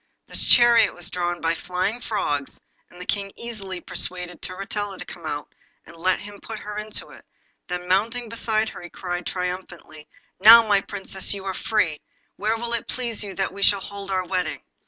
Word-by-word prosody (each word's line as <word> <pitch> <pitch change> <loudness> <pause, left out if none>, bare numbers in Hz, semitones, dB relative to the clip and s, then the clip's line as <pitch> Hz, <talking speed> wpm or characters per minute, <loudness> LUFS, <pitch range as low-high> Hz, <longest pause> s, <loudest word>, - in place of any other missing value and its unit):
This - - +2
chariot 240 -1 +7
was 175 0 -5
drawn 175 -1 -2
by 165 0 +2
flying 185 +7 -2
frogs, 145 - -2 0.3
and 180 - -15
the 180 - -7
King 200 0 -1
easily 200 -6 -5
persuaded 180 -1 -2
Turritella 195 +1 -3
to - - -7
come 170 -2 -9
out 145 -1 -4 0.3
and 170 - -13
let 180 +2 +2
him 205 0 -10
put 225 - -6
her 210 0 -7
into 215 0 -5
it, - - -14 0.4
then 180 0 -4
mounting 230 +6 +1
beside 220 -1 0
her - - -10
he 175 - -9
cried 175 0 -4
triumphantly 180 -4 -5 0.3
'Now, 230 +1 +10
my 200 -2 +4
Princess, 195 0 -2
you 195 -1 -8
are 190 - -2
free; 180 -6 0 0.3
where 215 +2 0
will 235 +1 -3
it 235 - -1
please 235 -4 -1
you 195 -2 -6
that 195 0 -1
we 200 - -8
shall 200 0 +5
hold 200 0 -7
our 185 -1 0
wedding? 180 -2 -2
195 Hz, 190 wpm, -24 LUFS, 180-215 Hz, 0.4 s, Now